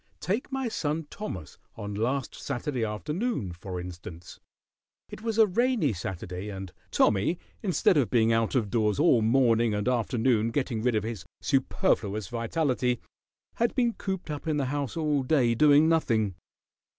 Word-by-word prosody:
Take 205 - -2
my 265 -1 -1
son 160 -6 -2
Thomas 95 - -7 0.2
on 105 -2 -5
last 125 +6 -1
Saturday 125 0 -3
afternoon, 150 - -2
for 90 +1 -6
instance. 85 -1 -9 0.7
It - - -9
was 225 -1 -2
a 220 - +7
rainy 220 - +1
Saturday, 90 +2 -5
and 95 -2 -7 0.2
Tommy, 105 - +2 0.2
instead 185 -3 +3
of 135 -5 +2
being 115 -2 +3
out 115 +3 +1
of 110 -6 +1
doors 110 -3 +1
all 145 -6 +4
morning 115 -1 +3
and 105 +3 -2
afternoon 120 -2 +2
getting 120 -2 -1
rid 120 0 +1
of 105 - +1
his 110 -5 -5 0.2
superfluous 100 -1 0
vitality, 125 0 0 0.6
had 235 +1 +1
been 240 -3 +2
cooped 190 -7 -4
up 150 +2 -6
in 155 -2 +1
the 140 - 0
house 145 0 -3
all 150 -3 +1
day 130 -3 +2
doing 150 +4 +5
nothing. 115 - +2
125 Hz, 155 wpm, -28 LUFS, 105-155 Hz, 0.7 s, a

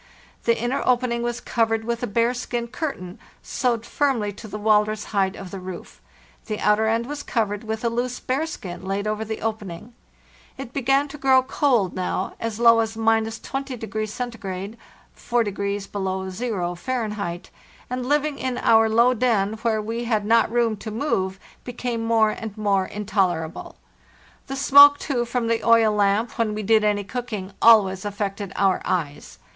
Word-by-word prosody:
The 230 -1 +3
inner 240 +4 -1
opening 245 -1 +1
was 240 0 -2
covered 225 -2 0
with 235 +1 -3
a 245 - -1
bearskin 235 +1 -1
curtain, 195 - -5 0.2
sewed 235 -3 -1
firmly 235 -7 0
to 220 +3 -10
the 210 - -6
walrus 210 0 +2
hide 195 -1 +1
of 190 -2 -9
the 195 - -6
roof; 185 -1 -9 0.5
the 215 -2 -2
outer 210 +1 +3
end 230 +1 +1
was 290 +2 -5
covered 210 -6 -2
with 220 +1 -4
a - - +4
loose 245 +2 -2
bearskin 255 - -4
laid 195 +2 -2
over 215 +1 -1
the 220 0 -5
opening. 215 -1 -5 0.6
It 265 -2 -8
began 275 +2 +2
to 295 +1 -9
grow 265 -1 +4
cold 250 -8 +1
now, 185 +1 -2
as 230 -1 -4
low 230 -1 +6
as 225 0 -1
—20° 225 +1 -1
C. 210 -3 -5 0.4
(4° 200 -4 -2
below 190 -1 -3
zero, 185 -4 -2
Fahr.); 210 -3 -3 0.5
and 250 0 -3
living 295 0 0
in 255 -1 -2
our 225 0 +4
low 235 +3 +4
den, 220 -4 +1
where 225 -2 +1
we 230 +2 -3
had 215 -3 0
not 225 +1 +3
room 235 -2 +1
to 210 +2 -7
move, 195 -6 -1 0.2
became 245 -1 -4
more 225 -1 +3
and 220 -1 -7
more 200 -3 +1
in 210 0 -6
tolerable. 175 -6 -1 0.7
Vhe 270 - -3
smoke, 285 +1 +8
too, 250 -6 -2
from 235 0 -2
the 230 0 0
oil 230 -2 +5
lamp, 205 +3 +1
when 215 -2 +1
we 215 - -4
did 220 +1 +4
any 205 -1 +1
cooking, 210 -4 -5
always 195 -5 +5
affected 200 -1 -4
our 195 -2 +2
eyes. 155 -6 -3
225 Hz, 165 wpm, -23 LUFS, 205-240 Hz, 0.7 s, smoke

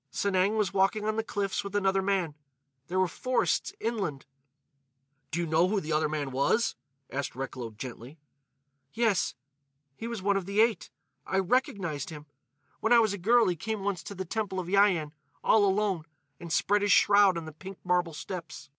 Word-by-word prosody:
"Sanang 200 +2 +1
was 210 -4 0
walking 200 +2 +2
on 215 0 0
the 225 - 0
cliffs 200 -3 -2
with 200 0 -6
another 195 -1 +2
man. 190 -5 0 0.5
There 185 +2 -1
were 185 - +3
forests, 255 - 0
inland." 200 - -3 1.0
"Do 170 - -2
you 170 - 0
know 160 +2 +3
who 205 +1 +1
the 160 -3 -5
other 155 0 +2
man 145 -3 -3
was?" 140 - +2 0.4
asked 140 -2 -3
Recklow 130 -2 -5
gently. 125 +4 -8 0.8
"Yes. 225 -4 +1 0.6
He 225 - -6
was 230 -5 -5
one 200 0 +2
of 190 -2 -4
the 200 +1 -1
Eight. 225 0 +2 0.4
I 190 - 0
recognised 190 - 0
him. 150 -2 -9 0.5
When 225 - 0
I - - +8
was 220 -3 +3
a - - -3
girl 235 +6 +4
he 180 - +1
came 205 +4 -4
once 195 -3 -1
to 200 - -7
the 190 0 -4
Temple 200 0 -2
of 180 - -3
Yian, 185 -5 +3 0.3
all 215 -2 +5
alone, 195 -4 0 0.3
and 170 -1 -8
spread 205 +4 +2
his 205 0 +2
shroud 200 -2 +5
on 165 - -5
the 155 - -7
pink 190 +4 -10
marble 175 -3 +1
steps. 165 -4 -7
190 Hz, 185 wpm, -29 LUFS, 165-205 Hz, 1.0 s, I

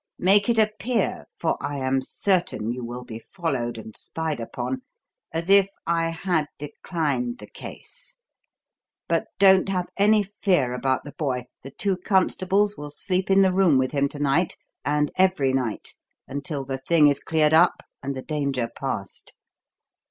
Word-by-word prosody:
Make 200 +4 +3
it 235 - +3
appear, 215 +1 0
for 165 - 0
I 145 0 -3
am 130 0 0
certain 170 - 0
you 125 0 -5
will 120 +1 -6
be 115 -2 -8
followed 130 - -3
and 110 -1 -9
spied 160 -4 -3
upon, 260 - -4 0.5
as 165 +1 -3
if 195 0 +6 0.2
I 165 -1 +1
had 165 -2 -1
declined 145 -5 -2
the - - -10
case. - - -11 0.9
But - - 0
don't 190 -1 +5
have 180 -2 -1
any 210 +1 +4
fear 185 - 0
about 130 +1 0
the 145 - -9
boy. 130 -5 -1 0.2
The 135 - -9
two 190 +7 -1
constables 195 +2 +2
will 150 0 -6
sleep 185 +6 -1
in 195 0 +6
the 190 -1 +3
room 180 -7 +4
with 130 0 +1
him 140 -1 +1
to 145 - -9
night 145 +4 +1 0.3
and 150 +1 +1
every 185 -8 +3
night 125 -5 -2 0.3
until 140 0 -4
the 135 0 -4
thing 150 +2 +4
is 140 -1 +2
cleared 155 -1 +2
up 170 +2 +4 0.2
and 140 0 -3
the 130 - -6
danger 140 -6 -2
past. 125 -8 -5
155 Hz, 160 wpm, -24 LUFS, 135-190 Hz, 0.9 s, if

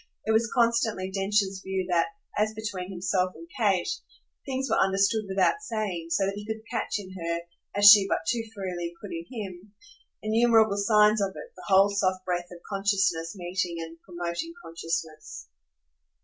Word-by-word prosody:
It 220 - +1
was 225 +1 +3
constantly 230 -6 +1
Densher's 195 0 0
view 190 -1 -2
that, 170 -1 +3 0.3
as 215 +1 0
between 205 -4 -5
himself 185 0 0
and 335 - -11
Kate, 200 -8 +2 0.6
things 265 0 -2
were 220 - +3
understood 200 +3 +2
without 195 - +2
saying, 210 - -3
so 180 +4 +2
that 195 - -1
he 205 +1 -7
could 220 +1 -5
catch 235 - -1
in 190 -2 -8
her, 170 -2 -3 0.3
as 205 0 +3
she 205 -2 +7
but - - 0
too 235 +4 +1
freely 175 -3 -4
could 205 - -9
in 165 0 -6
him, 200 -3 -8 0.5
innumerable 220 -1 +4
signs 210 +1 +4
of 195 -1 -1
it, 485 -1 -10
the - - -12
whole 195 +1 +5
soft 185 -2 0
breath 175 -1 -2
of 175 -1 -12
consciousness 195 -5 0
meeting 180 -1 -2
and 165 0 -8
promoting 175 - -5
consciousness. 165 - -5
195 Hz, 165 wpm, -27 LUFS, 180-215 Hz, 0.6 s, she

